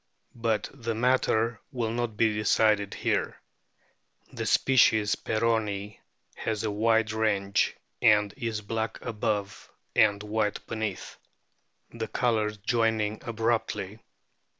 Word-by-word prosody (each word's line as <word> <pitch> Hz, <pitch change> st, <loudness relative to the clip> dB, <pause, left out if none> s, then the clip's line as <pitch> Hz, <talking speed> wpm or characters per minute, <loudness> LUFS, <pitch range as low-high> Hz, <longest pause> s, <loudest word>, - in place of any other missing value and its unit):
But 115 Hz, -3 st, -1 dB
the 115 Hz, -4 st, -4 dB
matter 115 Hz, -1 st, +1 dB
will 115 Hz, -3 st, -2 dB
not 120 Hz, -2 st, -3 dB
be 110 Hz, -2 st, +3 dB
decided 105 Hz, -1 st, +2 dB
here. -, -, -1 dB, 0.9 s
The -, -, -4 dB
species 110 Hz, -5 st, +4 dB
peronii 105 Hz, -3 st, -1 dB, 0.3 s
has 110 Hz, -1 st, -3 dB
a 110 Hz, -, -1 dB
wide 110 Hz, +1 st, +2 dB
range, 100 Hz, -3 st, +1 dB, 0.3 s
and 105 Hz, -3 st, +4 dB
is 115 Hz, -5 st, -3 dB
black 110 Hz, +2 st, -3 dB
above 105 Hz, -3 st, -3 dB, 0.3 s
and 105 Hz, -1 st, +4 dB
white 105 Hz, 0 st, -1 dB
beneath, 110 Hz, -4 st, -4 dB, 0.7 s
the 115 Hz, -1 st, -4 dB
colours 110 Hz, -4 st, 0 dB
joining 110 Hz, -1 st, 0 dB
abruptly. 115 Hz, -3 st, -2 dB
110 Hz, 105 wpm, -27 LUFS, 105-115 Hz, 0.9 s, species